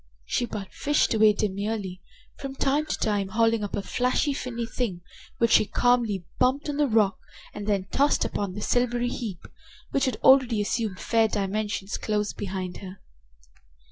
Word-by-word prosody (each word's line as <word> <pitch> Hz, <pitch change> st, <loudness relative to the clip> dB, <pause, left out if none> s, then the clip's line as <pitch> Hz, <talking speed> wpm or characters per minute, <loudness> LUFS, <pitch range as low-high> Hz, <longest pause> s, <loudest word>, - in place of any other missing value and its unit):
She 240 Hz, -, -1 dB
but 200 Hz, -4 st, -7 dB
fished 295 Hz, -3 st, +1 dB
away 215 Hz, -1 st, +5 dB
demurely, 200 Hz, -2 st, -3 dB, 0.3 s
from 270 Hz, -1 st, -7 dB
time 285 Hz, +3 st, +1 dB
to -, -, -2 dB
time 205 Hz, -3 st, 0 dB
hauling 225 Hz, +1 st, +2 dB
up 205 Hz, -, -3 dB
a 200 Hz, -, -3 dB
flashing 255 Hz, +6 st, 0 dB
finny 235 Hz, -3 st, -4 dB
thing, 225 Hz, -6 st, -3 dB, 0.4 s
which 230 Hz, -1 st, +2 dB
she 210 Hz, -, +5 dB
calmly 235 Hz, -7 st, +1 dB
bumped 265 Hz, +4 st, +2 dB
on 290 Hz, -, -2 dB
the 295 Hz, -1 st, +3 dB
rock 215 Hz, -4 st, +2 dB, 0.3 s
and 205 Hz, 0 st, -6 dB
then 200 Hz, -3 st, +1 dB
tossed 285 Hz, +1 st, +2 dB
upon 200 Hz, -2 st, -3 dB
the 210 Hz, -, -5 dB
silvery 245 Hz, +1 st, +1 dB
heap, 215 Hz, -8 st, -6 dB, 0.4 s
which 275 Hz, -, +2 dB
had 260 Hz, -4 st, 0 dB
already 260 Hz, -4 st, +6 dB
assumed 205 Hz, -2 st, -1 dB
fair 225 Hz, -1 st, +2 dB
dimensions, 205 Hz, -1 st, -2 dB
close 210 Hz, -1 st, -1 dB
behind 185 Hz, -2 st, -5 dB
her. 190 Hz, 0 st, -10 dB
220 Hz, 165 wpm, -26 LUFS, 200-245 Hz, 0.4 s, already